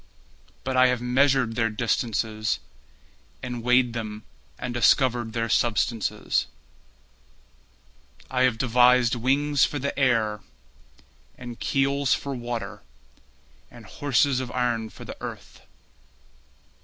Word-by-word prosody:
But 130 0 -2
I 130 0 +6
have 125 -1 0
measured 130 -1 +2
their 115 -1 +1
distances 110 -1 -1 0.9
And 125 -2 -4
weighed 125 0 +3
them 110 -2 -5 0.3
and 125 -1 -5
discovered 120 0 +2
their 115 -1 -1
substances. 115 -1 0 1.8
I 130 -1 -1
have 130 -3 +3
devised 125 -1 +4
wings 135 +4 +1
for 145 - +1
the 140 0 -3
air, 115 -5 +2 1.0
And 120 -2 -9
keels 140 0 +1
for 140 - -5
water, 120 -2 -5 0.9
And 120 -2 -14
horses 135 +3 +1
of 130 -1 -4
iron 120 -3 -1
for - - -12
the - - -8
earth. - - -9
125 Hz, 110 wpm, -25 LUFS, 115-130 Hz, 1.8 s, I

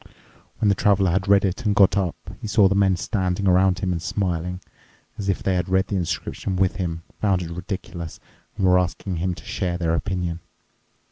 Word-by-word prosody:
When 105 - +1
the - - +5
Traveler 100 -1 +3
had 95 +2 0
read 100 0 +5
it 95 +7 -2
and 105 -2 +1
got 95 -1 +5
up, 95 -4 0 0.3
he - - -4
saw 105 -1 +5
the 95 - +2
men 100 -1 +3
standing 95 0 -1
around 95 0 +4
him 95 -1 -1
and 85 -2 -2
smiling, 90 -1 -2 0.6
as 100 -1 -2
if 95 - -1
they 95 - +1
had 90 +1 -1
read 95 +1 +2
the 100 - -1
inscription 90 +2 -2
with 95 0 +1
him, 85 -3 -3 0.2
found 95 -4 +1
it 85 - -7
ridiculous, 90 -1 -6 0.4
and 95 - +1
were 90 0 +5
asking 90 0 -2
him 90 +2 -1
to - - -13
share 90 -1 -2
their 85 -2 0
opinion. 90 -1 -2
95 Hz, 205 wpm, -23 LUFS, 90-100 Hz, 0.6 s, the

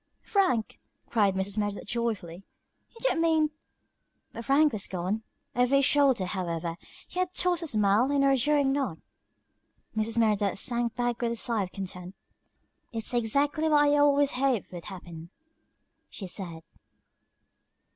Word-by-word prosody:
"Frank!" 365 - +1 0.3
cried 205 -4 +3
Mrs. 195 +2 -2
Merideth, 205 -1 -2
joyfully, 205 -6 -3 0.5
"you - - -33
don't - - +1
mean 320 -2 +3 0.4
" - - -48
But 230 0 -7
Frank 290 +1 +4
was 205 -3 -2
gone. 185 +4 -2 0.3
Over 250 +2 +3
his 275 -1 +4
shoulder, 275 -8 +3
however, 170 -3 -3 0.3
he 360 - -6
had 365 0 -1
tossed 355 -1 +1
a 330 - -4
smile 215 +1 +2
and 280 -1 +2
a - - +4
reassuring 275 +1 +3
nod. 270 - -1 1.0
Mrs. 220 +1 -1
Merideth 210 -4 +2
sank 235 +2 0
back 245 -1 -1
with 235 -1 0
a - - -4
sigh 230 -1 -1
of 185 -2 -4
content. 185 -1 -7 0.8
"It's 225 0 -4
exactly 280 +7 +1
what 295 -1 +5
I 290 0 +4
always 285 -1 +4
hoped 255 -4 0
would 175 -2 -8
happen," 170 -4 -9 0.8
she 200 - -7
said. 175 -3 -4
235 Hz, 150 wpm, -28 LUFS, 195-280 Hz, 1.0 s, what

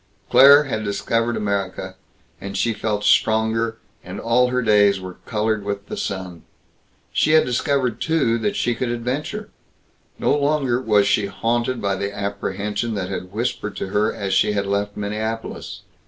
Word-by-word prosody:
Claire 140 +2 +8
had 110 -6 -3
discovered 115 +3 -1
America, 100 -2 -3 0.5
and 100 0 -5
she 115 - +1
felt 105 -1 -2
stronger, 110 +1 +2 0.3
and - - -7
all 120 +2 +3
her 125 0 0
days 105 -3 +4
were 95 -1 -9
colored 110 -1 0
with 100 0 -4
the - - -4
sun. 90 -4 -5 0.7
She 155 - +2
had 160 - +6
discovered, 125 -1 0
too, 140 -8 +1
that 205 - -1
she 120 - 0
could 120 +1 -2
adventure. 130 - -3 0.7
No - - +2
longer 140 -4 +1
was 105 -4 +3
she 105 -3 +2
haunted 120 +5 -1
by 100 -1 0
the 100 +1 -3
apprehension 100 +2 -3
that 95 -2 -3
had 90 -1 -5
whispered 110 -1 -3
to - - -4
her 105 +2 +1
as 100 -3 -3
she 95 +2 +3
had 100 -1 -1
left 100 +1 -2
Minneapolis. 110 +2 -4
110 Hz, 160 wpm, -21 LUFS, 100-120 Hz, 0.7 s, Claire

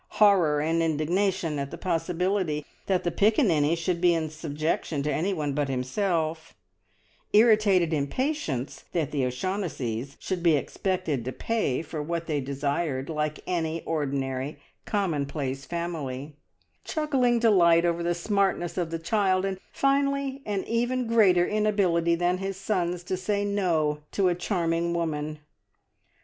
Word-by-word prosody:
Horror 180 -8 +5
and 165 +2 +1
indignation 165 +1 0
at 140 0 -3
the - - -7
possibility 180 -2 -1 0.2
that 190 -2 +1
the 175 - 0
Piccaninny 170 - +3
should 170 +1 -2
be 175 -1 +5
in 160 -2 -2
subjection 155 -1 -2
to 150 0 0
anyone 155 -3 -1
but 145 -1 -1
himself; 160 +4 -1 0.8
irritated 210 -6 +5
impatience 150 - -2
that 160 -5 0
the 140 -3 0
O'Shaughnessys 135 - -3
should 185 -2 -3
be 170 -2 +4
expected 165 -4 -2
to 130 - -3
pay 185 - -1
for 155 -1 -5
what 170 +2 -3
they 150 -3 -1
desired, 140 +1 -2
like 150 -1 -2
any 165 -2 -2
ordinary, 140 -2 -2 0.3
commonplace 145 - -2
family; 155 -5 -4 0.5
chuckling 270 -6 +1
delight 175 -7 +5
over 170 0 +1
the 170 0 0
smartness 190 -1 0
of 170 -2 -1
the 165 - -2
child; 185 +2 +1
and 190 -1 -3
finally 275 0 +1
an 200 -2 -1
even 240 +2 0
greater 200 -6 +4
inability 195 -6 +2
than 175 +1 +1
his 195 0 -3
sons 180 -3 -1
to 185 - -2
say 200 +2 -1
"No" 165 -7 +1
to 190 -2 +3
a - - +2
charming 170 -2 -1
woman! 155 -2 -2
170 Hz, 135 wpm, -27 LUFS, 150-195 Hz, 0.8 s, Horror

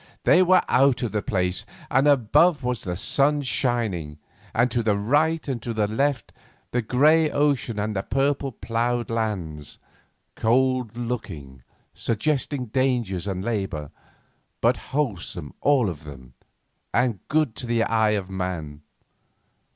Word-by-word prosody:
they 180 - +5
were 185 0 +5
out 135 0 +3
of 120 - -2
the 105 - -1
place, 90 -2 -1 0.3
and 135 +2 +3
above 145 +4 +4
was 125 -3 -2
the 90 -1 -4
sun 145 +8 +2
shining, 110 - -1 0.3
and, 120 +2 +2
to 120 - +1
the 105 -3 +1
right 150 +10 +1
and 125 -6 -3 0.3
left, 140 -3 0 0.4
the 125 - +1
grey 150 +7 +4
ocean 140 -7 0
and 105 +1 -2
the 95 - 0
purple 135 +3 0
plough 120 +1 -1
lands, 95 -10 -3 0.6
cold 125 0 +1
looking, 90 - -5 0.3
suggesting 130 +3 -1
dangers 120 -6 -1
and 95 0 -3
labour, 95 -10 -3 0.7
but - - +3
wholesome 95 - -3
all 140 -6 +3
of 80 -5 -5
them, 65 -4 -12 0.6
and 120 -4 +1
good 150 -6 +1
to 125 - -6
the 115 -1 +2
eye 110 -2 +2
of 95 -2 -4
man. 90 -6 -4
115 Hz, 135 wpm, -24 LUFS, 95-135 Hz, 0.7 s, they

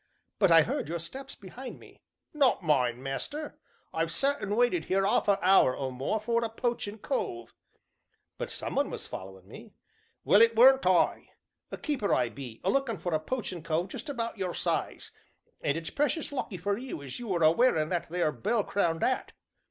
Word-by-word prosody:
"But 195 - +5
I 165 -1 +8
heard 150 - -3
your 170 - -2
steps 260 +12 -8
behind 240 +7 -9
me." - - -17 0.3
"Not 275 -9 +3
mine, 130 -5 +1
master. 290 - -5 0.3
I've - - -1
sat 280 +1 0
and 205 +1 -2
waited 235 -10 +2
'ere 195 +1 +3
'arf 200 - +2
a 200 -1 +4
hour, 185 -9 +5
or 135 -1 -3
more, 135 +12 -2
for 235 +2 0
a 230 - -1
poachin' 225 -2 -3
cove 120 - -3 0.4
" - - -49
"But - - -3
some - - -4
one - - +1
was - - -6
following 95 0 -9
me." - - -13 0.5
"Well, 205 - +5
it 230 0 +5
weren't 265 0 +6
I. 185 -1 +2 0.4
A - - -5
keeper 275 -10 0
I 125 -2 +1
be, 120 -3 -9
a - - +2
lookin' 270 -6 0
for 175 - -3
a 155 - +2
poachin' 185 -1 -4
cove 165 +3 -1
just 300 - -7
about 230 -5 -4
your 180 -2 -2
size, - - -2 0.5
and 145 - 0
it's 165 -1 -5
precious 295 +2 -1
lucky 255 -8 -4
for 200 +4 -1
you 245 - -6
as 135 - -7
you 235 -4 -5
are 170 - +1
a 155 - +7
wearin' 165 -7 +2
that 175 -2 -2
there 170 -2 +1
bell 205 - 0
crowned 170 -6 0
'at!" 255 - 0
195 Hz, 200 wpm, -29 LUFS, 155-240 Hz, 0.5 s, I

